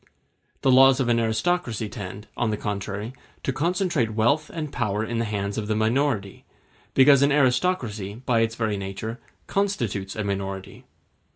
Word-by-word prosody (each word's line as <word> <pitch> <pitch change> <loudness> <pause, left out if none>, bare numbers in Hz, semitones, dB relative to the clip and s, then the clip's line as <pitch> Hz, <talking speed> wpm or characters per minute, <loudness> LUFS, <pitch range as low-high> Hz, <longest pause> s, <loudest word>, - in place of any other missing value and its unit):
The 135 - +4
laws 135 +1 +7
of 125 -3 +1
an 115 -1 +3
aristocracy 115 +1 0
tend, 100 +1 -7
on 120 - 0
the 105 - -1
contrary, 105 +3 -4 0.3
to 135 - -1
concentrate 165 - 0
wealth 140 +8 +2
and 155 -4 -5
power 105 +1 -1
in 115 0 -2
the 115 - 0
hands 100 -1 -2
of 105 - -4
the 110 - 0
minority, 110 -2 0 0.5
because 135 0 +7
an 140 +1 +4
aristocracy, 125 - +1
by 120 -1 0
its 115 0 +1
very 110 -3 -1
nature, 100 +5 -5 0.3
constitutes 120 - -1
a 110 - -2
minority. 95 -1 -4
115 Hz, 160 wpm, -25 LUFS, 105-135 Hz, 0.5 s, laws